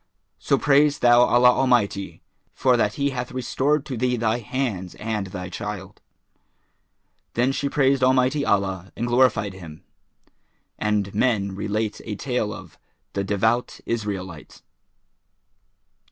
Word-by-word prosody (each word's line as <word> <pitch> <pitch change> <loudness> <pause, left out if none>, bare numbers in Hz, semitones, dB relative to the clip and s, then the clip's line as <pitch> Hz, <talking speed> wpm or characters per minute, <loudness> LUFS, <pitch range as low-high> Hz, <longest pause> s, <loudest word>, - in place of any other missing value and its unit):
[FN#413] - - -20
So - - +4
praise 145 +1 +3
thou 120 0 +5
Allah 125 0 +5
Almighty 120 -7 0 0.3
for 130 -1 +3
that 105 -3 +1
He 140 0 0
hath 125 -1 -4
restored 135 +4 0
to 135 - -5
thee 125 +1 0
thy 110 +1 0
hands 110 -6 -3
and 105 -3 -3
thy 90 -1 -6
child." 100 +1 -7 1.3
Then 125 +3 +2
she 140 +1 -2
praised 135 -2 +2
Almighty 130 +2 +3
Allah 95 -4 -1
and 120 - -2
glorified 120 -5 +2
Him. 80 -5 -11 1.0
And 105 -2 0
men 105 -3 +1
relate 105 +2 -3
a 105 - -5
tale 125 -2 -2
of - - -11 0.3
THE 100 - -1
DEVOUT 110 +5 0
ISRAELITE. 95 -7 -5
115 Hz, 130 wpm, -23 LUFS, 100-130 Hz, 1.3 s, thou